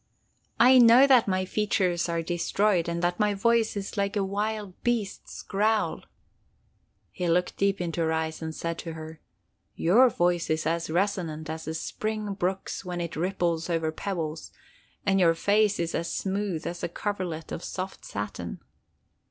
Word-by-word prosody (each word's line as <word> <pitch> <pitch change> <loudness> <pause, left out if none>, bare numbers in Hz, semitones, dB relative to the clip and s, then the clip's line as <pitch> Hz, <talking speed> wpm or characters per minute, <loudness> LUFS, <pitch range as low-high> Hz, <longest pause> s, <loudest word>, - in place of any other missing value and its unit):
'I 255 +2 +8
know 240 +3 +8
that 260 -5 +5
my 185 -1 0
features 185 -4 0
are 170 0 -1
destroyed, 175 +1 +1
and 170 +1 -2
that 175 +2 0
my 210 -1 +2
voice 230 +1 +2
is 200 +1 -5
like 200 0 0
a 200 - +1
wild 205 0 -2
beast's 230 -5 -2
growl.' 215 +2 0 1.1
"He 180 -2 -2
looked 180 +2 +1
deep 200 0 +1
into 170 -1 -2
her 160 -1 +1
eyes 160 0 -2
and 160 0 -5
said 165 0 -3
to 165 - -5
her: 160 0 -9 0.6
'Your 235 +10 +5
voice 175 -4 +1
is 155 0 0
as 165 +1 -1
resonant 165 -3 -1
as 160 0 -6
the 160 +1 -4
spring 215 +4 -3
brook's 190 0 -3
when 180 -1 -4
it 170 -1 -4
ripples 170 -1 -1
over 165 -2 0
pebbles, 160 -3 -4 0.5
and 195 -1 +3
your 165 -2 +4
face 205 +3 +2
is 170 -1 -1
as 170 - -2
smooth 195 -4 -2
as 175 0 -4
a - - -2
coverlet 180 -4 -4
of - - -5
soft 190 +1 -5
satin. 105 -11 -5
180 Hz, 165 wpm, -27 LUFS, 165-205 Hz, 1.1 s, I